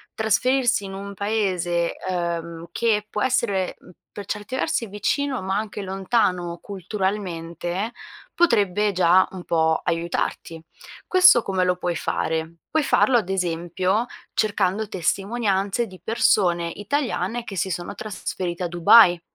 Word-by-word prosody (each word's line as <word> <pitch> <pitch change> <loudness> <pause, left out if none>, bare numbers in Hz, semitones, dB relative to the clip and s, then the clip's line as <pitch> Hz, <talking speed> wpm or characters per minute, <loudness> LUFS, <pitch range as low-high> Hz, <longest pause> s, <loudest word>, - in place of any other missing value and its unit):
trasferirsi 240 +1 +2
in 195 - -7
un 200 +1 -7
paese, 185 -5 -1
uhm, 170 -2 -3
che 210 0 +1
può 210 - -3
essere 205 -7 0 0.4
per 205 - -5
certi 210 +5 -5
versi 230 -3 -1
vicino, 250 +4 -1
ma 190 +1 -1
anche 210 -1 -4
lontano 185 -3 0
culturalmente, 190 -1 -3 0.4
potrebbe 210 - +2
già 185 0 +4
un 185 -2 -7
po' 160 -1 +2
aiutarti. 165 0 -2 0.5
Questo 365 -10 +6
come 190 -1 0
lo 180 0 +2
puoi 180 -1 -2
fare? 160 0 -2
Puoi 315 +1 +1
farlo, 265 -2 +3
ad 195 -5 -2
esempio, 185 +4 -1 0.3
cercando 205 0 0
testimonianze 195 +3 0
di 185 -3 -13
persone 180 -7 +2
italiane 240 - -2
che 195 - -8
si 185 +3 0
sono 175 -1 -4
trasferite 185 -4 -4
a 175 - 0
Dubai, 175 +1 +6
195 Hz, 125 wpm, -23 LUFS, 175-220 Hz, 0.5 s, Questo